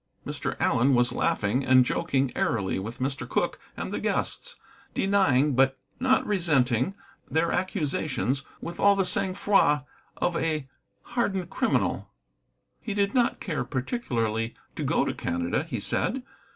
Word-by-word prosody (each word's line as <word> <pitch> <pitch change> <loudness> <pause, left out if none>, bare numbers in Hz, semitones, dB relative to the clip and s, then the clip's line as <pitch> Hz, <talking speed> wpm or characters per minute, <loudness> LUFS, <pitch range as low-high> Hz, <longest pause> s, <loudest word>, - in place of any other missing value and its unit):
Mr. - - -3
Allen 130 +3 +3
was 120 0 +3
laughing 110 +7 +1
and 130 -1 +5
joking 135 +1 0
airily 100 -5 0
with 110 +5 -6
Mr. 135 +1 -3
Cooke - - 0 0.2
and - - -4
the - - -1
guests, - - -2 0.4
denying, 150 -9 +3
but 135 +1 +3 0.2
not 260 0 +3
resenting, 165 - +2 0.3
their 165 +1 +1
accusations 155 - -1 0.2
with 170 +1 -6
all 200 0 +5
the 195 -1 +1
sang 185 0 +2
froid 150 -8 +3 0.3
of 175 - 0
a 155 -5 -1 0.4
hardened 195 -7 -2
criminal. 120 - 0 0.7
He 210 -3 -4
did 200 -1 +1
not 245 -2 +2
care 170 -7 -2
particularly 120 - -2 0.2
to - - -3
go - - +2
to - - -1
Canada, 85 0 -1
he - - -4
said. 260 +2 -1
150 Hz, 140 wpm, -27 LUFS, 125-195 Hz, 0.7 s, and